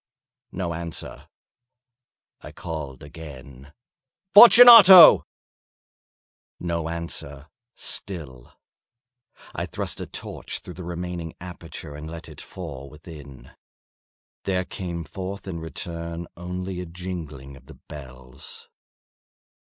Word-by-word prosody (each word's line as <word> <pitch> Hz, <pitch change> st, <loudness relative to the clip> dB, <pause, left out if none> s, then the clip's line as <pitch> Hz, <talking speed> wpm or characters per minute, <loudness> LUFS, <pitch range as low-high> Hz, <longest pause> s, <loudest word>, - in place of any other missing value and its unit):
No 85 Hz, -2 st, -4 dB
answer. 85 Hz, 0 st, -7 dB, 1.1 s
I -, -, -11 dB
called 75 Hz, -6 st, -8 dB
again— 70 Hz, -3 st, -12 dB, 0.6 s
"Fortunato!" 220 Hz, -6 st, +10 dB, 1.3 s
No 85 Hz, -2 st, -3 dB
answer 80 Hz, -3 st, -7 dB, 0.3 s
still. 75 Hz, -, -6 dB, 1.0 s
I -, -, -4 dB
thrust -, -, -4 dB
a -, -, -6 dB
torch -, -, -6 dB
through 90 Hz, -, -10 dB
the 90 Hz, -, -10 dB
remaining 85 Hz, -1 st, -6 dB
aperture 85 Hz, -3 st, -10 dB
and 75 Hz, +2 st, -9 dB
let 85 Hz, 0 st, -9 dB
it 75 Hz, -, -12 dB
fall 70 Hz, -7 st, -9 dB
within. 75 Hz, -3 st, -13 dB, 0.9 s
There 95 Hz, -2 st, -1 dB
came 85 Hz, -3 st, -6 dB
forth 95 Hz, +4 st, -8 dB
in 85 Hz, -3 st, -5 dB
return 85 Hz, +1 st, -7 dB
only 90 Hz, +1 st, -6 dB
a 90 Hz, -, -8 dB
jingling 80 Hz, -6 st, -8 dB
of 70 Hz, -, -18 dB
the -, -, -13 dB
bells. 65 Hz, -2 st, -13 dB
85 Hz, 100 wpm, -23 LUFS, 75-90 Hz, 1.3 s, Fortunato